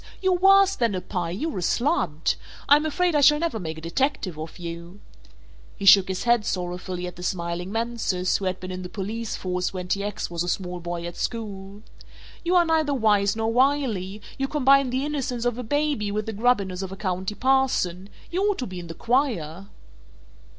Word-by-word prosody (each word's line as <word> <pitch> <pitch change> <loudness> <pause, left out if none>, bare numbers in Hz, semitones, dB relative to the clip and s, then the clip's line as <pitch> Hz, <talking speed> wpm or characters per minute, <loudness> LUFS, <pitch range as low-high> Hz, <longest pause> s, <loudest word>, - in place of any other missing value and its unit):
"You're 375 -1 +2
worse 390 +2 +5
than 230 -5 0
a 185 - -2
pie, 180 -3 -3
you're 215 - -3
a - - -4
slud! 180 - +1 0.3
I'm 295 +2 +5
afraid 355 +3 +1
I 295 - +3
shall 295 +1 +7
never 300 -8 -2
make 160 -3 -5
a - - -8
detective 185 - -1
of 155 +1 -7
you," 170 +2 -8 0.8
he 200 - -5
shook 195 -1 +8
his 190 -1 -3
head 240 -2 +3
sorrowfully 180 -1 -3
at 180 -1 -7
the - - -9
smiling 175 0 -3
Mansus 225 -5 0
who 195 - -5
had 185 0 -1
been 185 0 -6
in 185 0 -5
the 180 - -7
police 215 +4 -4
force 180 0 -2
when 180 -1 -4
T. 200 +1 0
X. 205 0 -3
was 170 -1 -2
a 175 - -1
small 180 -1 -3
boy 170 0 -5
at 175 0 -7
school, 205 -3 -5 0.6
"you 350 +1 +1
are 350 -1 +6
neither 315 -3 +2
Wise 205 -4 +3
nor 225 0 -1
Wily; 235 -7 +1 0.2
you 270 - 0
combine 275 -2 +4
the 260 +3 -1
innocence 260 -5 -2
of 245 0 0
a - - -1
Baby 285 -4 0
with 210 +1 -2
the 225 - -4
grubbiness 200 -5 +1
of 190 -1 -5
a 195 - -7
County 190 +1 -2
Parson 250 -9 +1 0.2
you 360 +2 0
ought 410 -2 +1
to 255 - -3
be 185 -4 -7
in 175 - -8
the 165 - -8
choir." 200 - -1
205 Hz, 205 wpm, -25 LUFS, 180-265 Hz, 0.8 s, shook